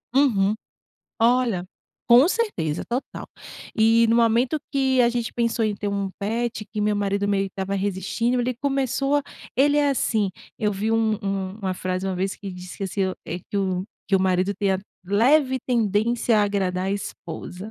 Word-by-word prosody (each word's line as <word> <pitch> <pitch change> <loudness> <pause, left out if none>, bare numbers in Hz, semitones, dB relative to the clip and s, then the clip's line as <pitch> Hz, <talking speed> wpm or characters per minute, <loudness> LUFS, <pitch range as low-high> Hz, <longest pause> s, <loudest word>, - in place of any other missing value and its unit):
Uhum. 215 -8 +3 0.7
Olha. 235 -5 +3 0.4
Com 250 +6 +7
certeza, 375 - -1
total. 245 +3 -4 0.5
E 225 +1 +5
no 230 - +4
momento 235 +5 +3
que 265 -2 +2
a 240 - +5
gente 240 -1 -2
pensou 230 -1 0
em 215 -1 0
ter 205 0 -3
um 200 -1 -2
pet, 220 +1 -2
que 215 - -6
meu 210 0 +2
marido 200 0 0
meio 200 -1 +1
que 195 - -7
estava 195 0 -3
resistindo, 205 +5 -1
ele 250 +1 -1
começou 275 +2 0
a 290 - +1 0.3
ele 290 +3 +4
é 290 -1 +3
assim, 220 -6 +1 0.3
eu 210 - +1
vi 210 +3 -1
um 225 -1 +2
um 195 -1 -2
uma 190 -1 0
frase 185 +1 -3
uma 190 - -1
vez 190 +1 -2
que 195 -2 -7
disse 180 0 -9
que 195 - -3
assim 190 0 -1
o, 185 - -3
eh, 175 - -4
"que - - -2
o 185 -2 0 0.2
que 200 - +1
o 190 - +4
marido 185 +1 +2
tem 200 0 0
a 190 - 0 0.2
leve 260 +8 +3
tendência 230 0 +2
a - - +4
agradar 190 -2 0
a - - 0
esposa", 185 0 -6
210 Hz, 190 wpm, -24 LUFS, 195-240 Hz, 0.7 s, Com